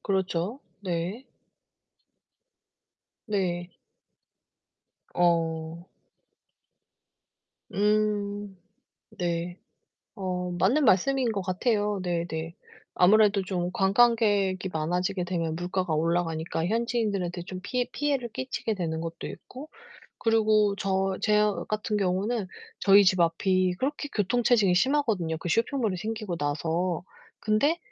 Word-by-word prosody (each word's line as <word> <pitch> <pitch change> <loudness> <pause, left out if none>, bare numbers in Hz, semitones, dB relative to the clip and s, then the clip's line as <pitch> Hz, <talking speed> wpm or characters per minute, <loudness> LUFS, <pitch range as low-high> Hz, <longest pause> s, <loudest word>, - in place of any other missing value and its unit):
그렇죠. 190 +3 -1 0.2
네. 185 +6 -3 2.0
네. 180 -4 -2 1.4
어. 165 -1 0 1.9
음. 205 -1 0 0.6
네. 175 0 -2 0.6
어 180 -3 -3
맞는 250 - +3
말씀인 240 +4 +3
것 195 -2 -2
같아요. 205 +1 0
네네. 170 -2 -3 0.4
아무래도 205 +1 +5
좀 180 -1 -2
관광객이 200 -2 +3
많아지게 180 +4 -1
되면 165 -3 -2
물가가 180 -1 -2
올라가니까 165 0 -1
현지인들한테 210 -6 -1
좀 185 +1 -7
피해 250 +3 -1
피해를 275 -4 -1
끼치게 255 -4 -3
되는 160 -3 -2
것도 165 0 -6
있고. 270 +4 -10 0.5
그리고 215 -2 +3
저 190 -1 0
제 210 -1 +3 0.3
같은 215 0 -1
경우는 200 +2 0 0.3
저희 200 0 +7
집 185 -1 +3
앞이 185 +2 +2
그렇게 290 +2 -2
교통체증이 215 -2 +3
심하거든요, 215 - +1
그 175 - -5
쇼핑몰이 230 - 0
생기고 215 -2 -4
나서. 160 +4 -1 0.4
근데 280 +11 +2
190 Hz, 225 characters per minute, -27 LUFS, 175-215 Hz, 2.0 s, 저희